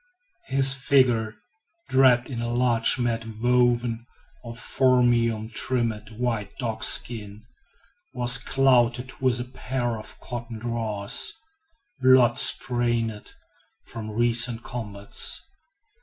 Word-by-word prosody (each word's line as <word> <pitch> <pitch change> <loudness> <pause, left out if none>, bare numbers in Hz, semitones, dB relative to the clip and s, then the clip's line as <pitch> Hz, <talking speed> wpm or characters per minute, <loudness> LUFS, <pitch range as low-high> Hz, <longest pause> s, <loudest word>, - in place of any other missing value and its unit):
His 135 0 +3
figure, 125 -5 +1 0.5
draped 125 -2 +3
in 120 -4 -5
a 120 - -3
large 120 -1 +2
mat 120 -2 -2 0.2
woven 120 -1 +1 0.4
of 115 -1 -9
"phormium" 120 -4 +1
trimmed 115 -5 -1
with 115 -4 -3
dogskins, 105 -3 +1 0.7
was 125 +1 +2
clothed 125 -1 +1
with 125 -2 +2
a - - -3
pair 125 -2 -4
of 105 - -12
cotton 120 -2 -7
drawers, 110 -3 -2 0.7
blood 130 -2 +4
stained 120 -3 +1 0.5
from 110 -2 -8
recent 120 +1 +2
combats. 105 -4 -4
120 Hz, 95 wpm, -24 LUFS, 115-125 Hz, 0.7 s, blood